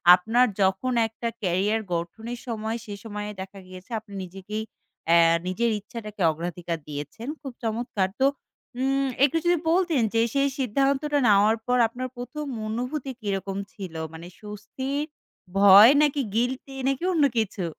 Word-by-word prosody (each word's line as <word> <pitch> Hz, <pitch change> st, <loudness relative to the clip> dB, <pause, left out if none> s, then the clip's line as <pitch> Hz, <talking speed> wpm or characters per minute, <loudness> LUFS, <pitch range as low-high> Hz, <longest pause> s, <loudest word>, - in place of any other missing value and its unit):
আপনার 225 Hz, +7 st, +2 dB
যখন 190 Hz, +7 st, +1 dB
একটা 225 Hz, +1 st, -5 dB, 0.2 s
ক্যারিয়ার 195 Hz, +5 st, +1 dB
গঠনের 225 Hz, +8 st, -4 dB
সময়, 225 Hz, 0 st, -3 dB
সে 205 Hz, -, -7 dB
সময়ে 210 Hz, -1 st, -5 dB
দেখা 195 Hz, +1 st, -9 dB
গিয়েছে 185 Hz, +3 st, -12 dB
আপনি 210 Hz, -2 st, -16 dB
নিজেকেই 195 Hz, +4 st, -6 dB, 0.4 s
অ্যা 170 Hz, 0 st, +6 dB, 0.3 s
নিজের 230 Hz, +6 st, +1 dB
ইচ্ছাটাকে 210 Hz, -2 st, -8 dB
অগ্রাধিকার 170 Hz, +1 st, -4 dB
দিয়েছেন। 150 Hz, -, -6 dB
খুব 270 Hz, -4 st, -7 dB
চমৎকার! 220 Hz, -4 st, -1 dB
তো, 265 Hz, -, +4 dB, 0.6 s
উম 270 Hz, +1 st, +1 dB, 0.2 s
একটু 290 Hz, +4 st, +4 dB
যদি 350 Hz, 0 st, +4 dB
বলতেন 340 Hz, -7 st, +2 dB
যে, 225 Hz, -, +3 dB
সেই 280 Hz, 0 st, +2 dB
সিদ্ধান্তটা 275 Hz, +4 st, +1 dB
নেওয়ার 210 Hz, +2 st, +5 dB
পর 250 Hz, 0 st, +3 dB
আপনার 255 Hz, +3 st, -5 dB
১ম 300 Hz, +5 st, -5 dB, 0.2 s
অনুভূতি 250 Hz, +5 st, -3 dB
কিরকম 195 Hz, -1 st, -3 dB, 0.2 s
ছিল? 185 Hz, -5 st, -8 dB, 0.2 s
মানে 165 Hz, +2 st, -9 dB
স্বস্তির, 260 Hz, +8 st, -4 dB, 0.5 s
ভয়, 200 Hz, +4 st, +9 dB
নাকি 290 Hz, -1 st, +2 dB
গিল্টি, 260 Hz, +3 st, -1 dB
নাকি 275 Hz, +3 st, 0 dB
অন্য 305 Hz, -4 st, +4 dB
কিছু? 205 Hz, -4 st, -1 dB
225 Hz, 140 wpm, -25 LUFS, 195-260 Hz, 0.6 s, ভয়